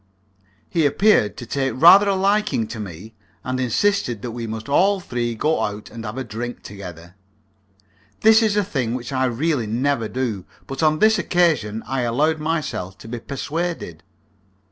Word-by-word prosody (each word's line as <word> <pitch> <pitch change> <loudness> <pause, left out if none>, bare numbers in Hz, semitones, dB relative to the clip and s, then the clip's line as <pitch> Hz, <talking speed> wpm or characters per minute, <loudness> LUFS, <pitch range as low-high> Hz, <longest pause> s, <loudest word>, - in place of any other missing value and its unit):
He 165 -4 +2
appeared 145 - +3
to 120 - -7
take 135 +1 -1
rather 185 +9 +7
a 195 - +2
liking 200 - +1
to 115 0 -6
me, 100 +2 -8 0.3
and 130 0 -2
insisted 125 - 0
that 120 - -4
we 115 0 -5
must 110 0 -6
all 190 +8 +3
three 120 -8 -3
go 155 +8 0
out 105 0 -4
and 115 0 -8
have 105 +4 -6
a 130 - -2
drink 120 +2 -6
together. 90 -4 -10 1.1
This 220 +1 +6
is 215 -2 +1
a 205 - +3
thing 130 - -2
which 125 +2 -6
I 130 0 +1
really 130 0 0
never 120 +1 0
do, 115 -7 -3 0.2
but 135 - -5
on 155 -1 +3
this 215 +3 +4
occasion 150 - +1
I 130 +3 -2
allowed 145 +7 +1
myself 150 - -3
to - - -12
be 120 +1 -5
persuaded. 145 - -4
130 Hz, 170 wpm, -21 LUFS, 110-165 Hz, 1.1 s, rather